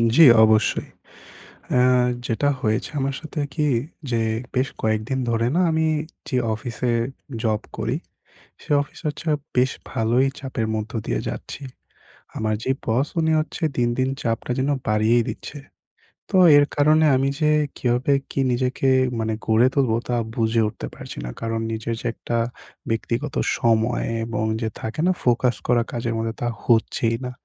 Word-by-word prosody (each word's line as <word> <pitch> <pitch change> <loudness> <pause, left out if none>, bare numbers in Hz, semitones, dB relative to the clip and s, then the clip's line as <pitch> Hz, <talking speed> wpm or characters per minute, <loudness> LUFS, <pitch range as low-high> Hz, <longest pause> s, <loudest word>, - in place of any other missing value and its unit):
জি, 165 - +8 0.2
অবশ্যই। 110 -1 +3 0.9
এহ 125 0 +4 0.2
যেটা 145 +5 +1
হয়েছে 110 -1 0
আমার 135 0 -1
সাথে 155 0 -6
কি 150 -2 +1 0.4
যে 115 -1 +1 0.3
বেশ 130 +2 +2
কয়েকদিন 110 +4 0
ধরে 115 0 +1
না, 185 - +3
আমি 160 0 +2 0.4
যে 130 - 0 0.2
অফিসে 120 +2 -3 0.5
জব 110 -1 +1 0.2
করি, - - -1 0.7
সে - - -16
অফিসে 145 - -13
হচ্ছে 150 - -6 0.3
বেশ 125 +1 +4 0.2
ভালোই 120 +4 +2
চাপের 130 -5 -3
মধ্য 110 +1 -4
দিয়ে - - -1
যাচ্ছি। 140 - -7 0.7
আমার 110 0 0
যে 130 - -2 0.2
বস, 125 +6 +2
উনি 160 0 +2
হচ্ছে 160 +2 -6
দিন, 120 -1 +2
দিন 130 0 +2
চাপটা 115 +1 -2
যেন 135 +2 +1 0.2
বাড়িয়েই 110 +3 +3
দিচ্ছে। 150 - -6 0.7
তো 190 - +2 0.2
এর 145 - +6
কারণে 155 +2 +4
আমি 135 +1 +2
যে 150 -1 +3 0.3
কীভাবে 125 +3 +1 0.2
কি - - -3
নিজেকে 130 +2 +1 0.3
মানে 110 0 -1
গড়ে 115 +3 +4
তুলবো, 130 -6 +2
তা 120 - 0 0.2
বুঝে 115 0 +2
উঠতে - - -6
পারছি - - -9
না। - - -4
কারণ 115 0 -1
নিজের 115 +1 -3
যে - - -12
একটা 120 - -3 0.5
ব্যক্তিগত 115 +5 -2 0.2
সময় 115 +1 +2 0.2
এবং 110 -1 -2 0.2
যে 110 - 0
থাকে 110 +7 -5
না - - +5
ফোকাস 125 0 +2
করা 120 -1 +3
কাজের 115 -1 -2
মধ্যে, 115 0 -2
তা 120 - 0 0.2
হচ্ছেই 115 0 +2
না। 125 - -4
120 Hz, 155 wpm, -23 LUFS, 115-135 Hz, 0.9 s, জি